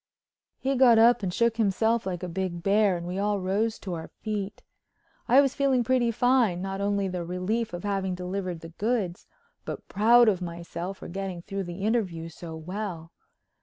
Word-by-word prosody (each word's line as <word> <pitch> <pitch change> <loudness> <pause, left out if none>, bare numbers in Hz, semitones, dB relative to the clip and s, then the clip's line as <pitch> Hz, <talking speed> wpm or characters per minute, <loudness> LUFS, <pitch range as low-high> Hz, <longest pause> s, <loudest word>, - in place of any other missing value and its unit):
He 270 +1 -1
got 245 -3 +6
up 235 +1 +6
and 190 -3 -1
shook 235 +4 +1
himself 220 +1 +1
like 180 -1 -4
a - - -2
big 175 -1 -3
bear 200 -1 +3
and 170 - -7
we 180 +2 -3
all 205 0 +1
rose 205 +4 0
to 185 - -6
our 160 -1 -5
feet. 210 -2 -5 0.6
I 265 +3 +7
was 275 -2 +1
feeling 270 -3 +2
pretty 245 0 +2
fine, 235 -5 +2
not 195 +1 -4
only 200 -1 0
the 180 -2 -3
relief 185 +7 -2
of 175 +1 -6
having 195 -2 -1
delivered 180 -1 -4
the 165 - -9
goods, 200 -1 -2 0.4
but - - -7
proud 235 +4 +5
of 190 -4 +2
myself 170 +2 -5
for - - -9
getting 190 -1 -5
through 195 0 -4
the 175 +3 -6
interview 190 -7 -1
so 165 0 -9
well. 170 0 -5
195 Hz, 185 wpm, -27 LUFS, 180-225 Hz, 0.6 s, I